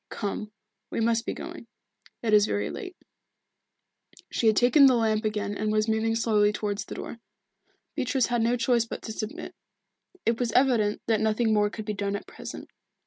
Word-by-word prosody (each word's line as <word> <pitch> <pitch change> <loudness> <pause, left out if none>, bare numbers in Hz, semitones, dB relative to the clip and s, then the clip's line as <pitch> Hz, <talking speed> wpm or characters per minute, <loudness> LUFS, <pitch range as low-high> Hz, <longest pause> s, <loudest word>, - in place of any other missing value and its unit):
Come, 210 +1 -4 0.4
we - - -3
must 230 0 +1
be - - -1
going. - - -8 0.6
It 220 -2 +1
is 210 0 +6
very 205 - -1
late." 380 -5 -7 1.4
She 230 - +1
had 215 - +5
taken 250 +5 +6
the 255 - +5
lamp 220 -1 +1
again 210 -1 -2
and 215 +1 -1
was 215 +1 +1
moving 220 0 +1
slowly 215 -2 +3
towards 205 -1 -3
the - - -8
door. 235 - -7 0.7
Beatrice 260 -3 +1
had 240 -1 0
no 235 +2 +2
choice 235 -1 +2
but - - -7
to - - -5
submit. 215 0 -6 0.7
It 230 0 +1
was 240 -2 0
evident 240 -6 +2
that 220 -2 +1
nothing 220 +1 +2
more 210 -1 +3
could 215 0 -7
be 210 - -2
done 200 0 -2
at 200 - -6
present. - - -9
220 Hz, 185 wpm, -27 LUFS, 210-235 Hz, 1.4 s, is